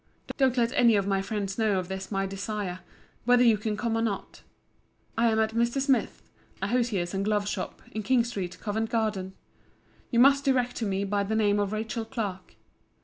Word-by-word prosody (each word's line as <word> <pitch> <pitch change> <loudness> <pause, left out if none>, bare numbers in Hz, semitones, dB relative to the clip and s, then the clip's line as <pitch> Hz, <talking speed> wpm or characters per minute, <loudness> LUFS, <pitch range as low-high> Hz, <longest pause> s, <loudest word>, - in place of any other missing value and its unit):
Don't 265 -2 +2
let 235 0 +2
any 235 -3 +5
of 200 -1 +1
my 195 -1 +1
friends 200 0 -3
know 215 -3 +2
of 185 -1 -2
this 190 0 -5
my 195 -1 0
desire: 195 -1 -4 0.5
whether 245 0 +5
you 230 -3 +6
can 210 0 -3
come 225 +1 -1
or 225 - +1
not. 215 -4 -3 0.7
I 235 +1 +3
am 220 -1 +2
at 220 0 +1
Mr. 235 +3 +1
Smith's, 270 -1 0 0.4
a 195 - -2
hosier's 220 -8 0
and 195 0 -1
glove 205 -1 0
shop, 190 -2 -4
in 215 - -3
King 240 +3 +3
street, 195 -7 -5
Covent 220 +1 -2
garden. 205 -5 -1 0.7
You 235 - -1
must 275 +2 +6
direct 250 -3 +1
to 225 - -1
me 195 0 -1
by 200 0 0
the 215 +2 -2
name 205 -2 +3
of 205 -1 0
Rachel 225 +1 -3
Clark. 200 -6 -5
215 Hz, 200 wpm, -27 LUFS, 195-235 Hz, 0.7 s, you